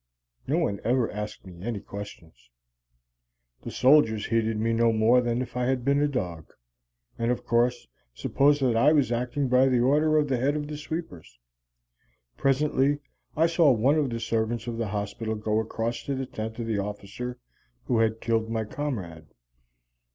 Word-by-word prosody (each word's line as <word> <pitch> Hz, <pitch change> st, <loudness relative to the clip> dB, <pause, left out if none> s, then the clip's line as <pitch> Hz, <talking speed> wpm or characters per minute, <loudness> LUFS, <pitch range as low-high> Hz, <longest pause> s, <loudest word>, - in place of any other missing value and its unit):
No -, -, +1 dB
one 100 Hz, 0 st, -1 dB
ever 120 Hz, +1 st, +1 dB
asked 105 Hz, 0 st, -6 dB
me 90 Hz, -2 st, -12 dB
any 110 Hz, 0 st, -3 dB
questions. 100 Hz, -10 st, -10 dB, 1.1 s
The -, -, -7 dB
soldiers 130 Hz, -6 st, +4 dB
heeded 115 Hz, -1 st, 0 dB
me 115 Hz, +1 st, 0 dB
no 115 Hz, 0 st, +3 dB
more 115 Hz, +3 st, +4 dB
than 120 Hz, +1 st, -1 dB
if 125 Hz, 0 st, -11 dB
I 125 Hz, 0 st, 0 dB
had 130 Hz, -2 st, -1 dB
been 140 Hz, +1 st, +3 dB
a 145 Hz, -, +3 dB
dog, 90 Hz, -, -4 dB, 0.7 s
and, 115 Hz, 0 st, 0 dB
of 125 Hz, -, -1 dB
course, 120 Hz, -, +1 dB, 0.3 s
supposed 145 Hz, -, +2 dB
that 125 Hz, -3 st, +2 dB
I 140 Hz, +7 st, +5 dB
was 140 Hz, -6 st, +2 dB
acting 125 Hz, +3 st, -1 dB
by 125 Hz, +1 st, +4 dB
the 125 Hz, -2 st, +2 dB
order 150 Hz, +4 st, +3 dB
of 150 Hz, -1 st, +2 dB
the 130 Hz, -2 st, 0 dB
head 140 Hz, +4 st, +1 dB
of 150 Hz, -1 st, -3 dB
the 150 Hz, -, -5 dB
sweepers. 150 Hz, -, -7 dB, 1.0 s
Presently 140 Hz, +1 st, +2 dB, 0.4 s
I 160 Hz, -, +5 dB
saw 165 Hz, -2 st, +4 dB
one 130 Hz, +5 st, +3 dB
of 145 Hz, -3 st, 0 dB
the 115 Hz, -1 st, -3 dB
servants 115 Hz, 0 st, -1 dB
of 120 Hz, -1 st, -4 dB
the 115 Hz, -, -1 dB
hospital 105 Hz, +2 st, -3 dB
go 105 Hz, 0 st, 0 dB
across 115 Hz, +1 st, -3 dB
to 140 Hz, -, -2 dB
the 130 Hz, 0 st, -3 dB
tent 110 Hz, -2 st, -6 dB
of 115 Hz, -, -4 dB
the 110 Hz, -3 st, -1 dB
officer 105 Hz, +5 st, -5 dB, 0.5 s
who 120 Hz, -, +1 dB
had 110 Hz, 0 st, +1 dB
killed 115 Hz, -1 st, 0 dB
my 115 Hz, -1 st, -1 dB
comrade. 95 Hz, -, -5 dB
120 Hz, 180 wpm, -26 LUFS, 110-135 Hz, 1.1 s, I